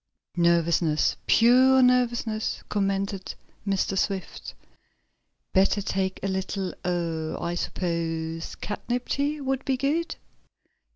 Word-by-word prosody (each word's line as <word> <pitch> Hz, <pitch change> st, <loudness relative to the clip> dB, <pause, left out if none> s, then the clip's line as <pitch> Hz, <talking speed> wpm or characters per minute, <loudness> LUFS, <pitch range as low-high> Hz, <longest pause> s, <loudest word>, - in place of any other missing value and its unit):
"Nervousness, 170 Hz, -2 st, +3 dB
pure 255 Hz, +3 st, +6 dB
nervousness," 240 Hz, -3 st, +1 dB
commented 195 Hz, -1 st, -1 dB, 0.3 s
Mr. 195 Hz, 0 st, 0 dB
Swift. 195 Hz, 0 st, -3 dB, 1.0 s
"Better 195 Hz, +1 st, +3 dB
take 190 Hz, -1 st, -2 dB
a -, -, 0 dB
little 190 Hz, 0 st, -2 dB
er 170 Hz, -3 st, -2 dB
I 170 Hz, -, -2 dB
suppose 165 Hz, -2 st, -3 dB
catnip 245 Hz, +4 st, -4 dB
tea 290 Hz, +2 st, 0 dB
would 270 Hz, -1 st, -1 dB
be 265 Hz, -1 st, 0 dB
good." 320 Hz, +5 st, 0 dB
195 Hz, 100 wpm, -26 LUFS, 170-245 Hz, 1.0 s, pure